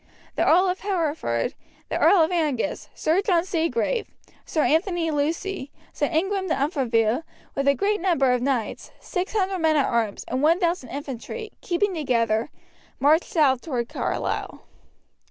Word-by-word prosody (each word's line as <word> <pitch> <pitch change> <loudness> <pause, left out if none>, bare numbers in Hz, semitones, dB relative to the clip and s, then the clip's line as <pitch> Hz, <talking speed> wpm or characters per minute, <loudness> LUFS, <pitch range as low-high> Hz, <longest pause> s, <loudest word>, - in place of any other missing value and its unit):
The - - +1
Earl 365 +4 +5
of 365 +1 -1
Hereford, 315 - -1 0.4
the - - -1
Earl 370 -5 +6
of 320 - 0
Angus, 300 -7 -1
Sir 330 +5 +2
John 360 -4 +2
Seagrave, 380 +7 -1 0.4
Sir 310 - +1
Anthony 330 0 +1
Lucy, 310 +1 -2 0.2
Sir 290 - 0
Ingram 380 +4 0
de 325 - +1
Umfraville, 250 - +1 0.3
with 275 0 -1
a 280 - +5
great 410 +2 0
number 330 -9 +3
of 250 -1 +1
knights, 250 -4 -2
600 380 -1 -1
men 320 -1 +3
at 285 - +3
arms, 225 -4 -1
and 255 +2 -2
1000 335 -2 +2
infantry, 285 - -6
keeping 380 +2 0
together, 235 -6 0 0.5
marched 310 +4 +4
south 285 - +3
toward 245 -7 -3
Carlisle. - - -3
315 Hz, 145 wpm, -24 LUFS, 270-370 Hz, 0.5 s, Earl